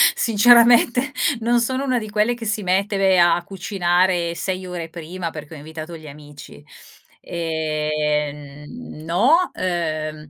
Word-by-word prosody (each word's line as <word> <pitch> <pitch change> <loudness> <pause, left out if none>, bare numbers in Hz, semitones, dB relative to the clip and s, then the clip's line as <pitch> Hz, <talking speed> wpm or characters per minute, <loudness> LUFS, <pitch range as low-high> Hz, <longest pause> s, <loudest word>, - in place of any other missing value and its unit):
Sinceramente 240 +4 +4 0.3
non 240 +1 +2
sono 260 +3 -1
una 255 -3 0
di 215 -1 -7
quelle 210 +3 +1
che 235 -1 -8
si 210 -1 -2
mette 195 +2 0
ve 190 -1 +3
a 175 -1 +5
a 175 - -4
cucinare 180 -2 0
6 185 0 -4
ore 175 -2 -6
prima 170 +1 -6
perché 155 -1 -10
ho - - -9
invitato 160 +3 -9
gli 155 -1 -12
amici. 145 0 -13 0.6
Ehm, 150 -3 -3
mhmm, 240 -9 -10
no, 255 - +2
uhm, 155 -4 -3
175 Hz, 145 wpm, -21 LUFS, 155-215 Hz, 0.6 s, a